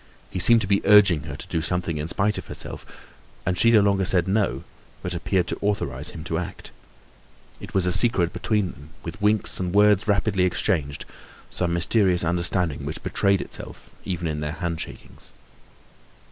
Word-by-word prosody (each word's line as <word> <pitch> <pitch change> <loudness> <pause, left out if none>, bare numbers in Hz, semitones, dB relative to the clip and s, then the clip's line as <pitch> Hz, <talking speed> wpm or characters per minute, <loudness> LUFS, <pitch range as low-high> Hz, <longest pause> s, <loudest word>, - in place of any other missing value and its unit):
He - - -4
seemed 115 +5 +7
to 95 - -3
be 100 0 +2
urging 100 -7 +5
her 70 - -6
to - - -8
do 80 - -2
something 85 -2 -1
in 75 - -3
spite 105 +4 +1
of - - -11
herself; - - -9 0.3
and 90 - 0
she 115 +6 +4
no 110 -2 +6
longer 100 -1 +2
said 90 -1 +2
"no," 100 +1 0 0.4
but 90 - -3
appeared 90 +1 0
to - - -4
authorize 85 - -1
him 80 -3 -9
to 80 -1 -2
act. 90 +1 -8 0.9
It - - -11
was 95 -2 +2
as 90 - +2
a - - +8
secret 95 -8 +1
between 105 -5 -1
them, 70 +2 -15
with 85 +5 -8
winks 105 0 +1
and 90 0 -3
words 105 0 +4
rapidly 100 -2 +1
exchanged, 75 -5 -1 0.5
some 85 -1 -1
mysterious 90 +1 +2
understanding 85 -3 +1
which - - -6
betrayed 100 -1 +1
itself - - -10
even 85 -2 -3
in 75 -1 -3
their 75 0 -4
handshakings. 85 -1 -7
90 Hz, 180 wpm, -23 LUFS, 85-100 Hz, 0.9 s, a